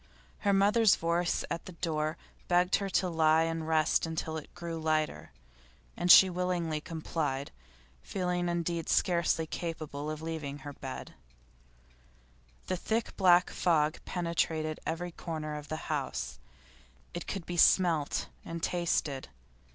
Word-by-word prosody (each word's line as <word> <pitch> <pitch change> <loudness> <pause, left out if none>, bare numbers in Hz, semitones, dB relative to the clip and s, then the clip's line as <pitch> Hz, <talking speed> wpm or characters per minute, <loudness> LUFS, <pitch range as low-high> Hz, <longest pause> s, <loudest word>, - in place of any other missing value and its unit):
Her 200 - +2
mother's 205 +2 +5
voice 170 +1 0
at 165 - -3
the 185 - -9
door 155 -1 -2 0.3
begged 180 +1 +3
her 200 -1 -3
to 185 0 +1
lie 160 -1 +3
and 165 -1 -2
rest 160 0 +2
until 160 0 -3
it 155 - -7
grew 170 -2 -5
lighter, 155 -1 -1 0.6
and 175 0 +3
she 190 - +10
willingly 175 -4 -1
complied, 150 -4 -3 0.5
feeling 180 - -1
indeed 170 -1 -2
scarcely 170 -2 +2
capable 155 -3 -5
of 155 0 -5
leaving 155 -3 -4
her 145 - -6
bed. 135 -1 -7 1.5
The 185 - -1
thick 225 +5 -2
black 180 -2 +5
fog 155 -3 +1
penetrated 160 -3 -1
every 175 +2 -3
corner 155 -3 -5
of 150 -1 -7
the 155 - -3
house. - - -3 0.7
It 175 - -5
could 195 -4 -4
be 175 - -4
smelt 165 -4 +4 0.2
and 165 0 -6
tasted. 160 -6 -1
165 Hz, 135 wpm, -31 LUFS, 155-175 Hz, 1.5 s, she